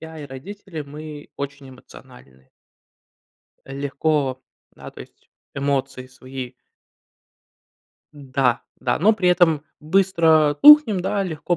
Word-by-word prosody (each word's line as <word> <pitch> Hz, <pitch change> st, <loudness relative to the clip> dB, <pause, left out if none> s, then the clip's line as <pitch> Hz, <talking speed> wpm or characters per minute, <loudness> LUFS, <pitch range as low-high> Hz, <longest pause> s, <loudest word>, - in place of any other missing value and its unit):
я, 160 Hz, 0 st, -10 dB
и -, -, -8 dB
родители 165 Hz, +4 st, -9 dB
мы 150 Hz, +1 st, -10 dB
очень 140 Hz, -1 st, -7 dB
эмоциональны. 65 Hz, -, -17 dB, 1.2 s
Легко. 140 Hz, -1 st, -2 dB, 0.3 s
Да. -, -, -11 dB
То -, -, -14 dB
есть -, -, -16 dB, 0.2 s
эмоции 135 Hz, -2 st, -2 dB
свои 130 Hz, 0 st, -9 dB, 1.6 s
Да, 135 Hz, -3 st, -1 dB, 0.2 s
да, -, -, -1 dB
но 210 Hz, +7 st, +4 dB
при 185 Hz, -4 st, 0 dB
этом 165 Hz, -4 st, +3 dB, 0.2 s
быстро 160 Hz, -3 st, +2 dB
тухнем, 295 Hz, -10 st, +8 dB
да, 195 Hz, +2 st, -1 dB
легко 170 Hz, 0 st, -3 dB
145 Hz, 110 wpm, -21 LUFS, 135-175 Hz, 1.6 s, тухнем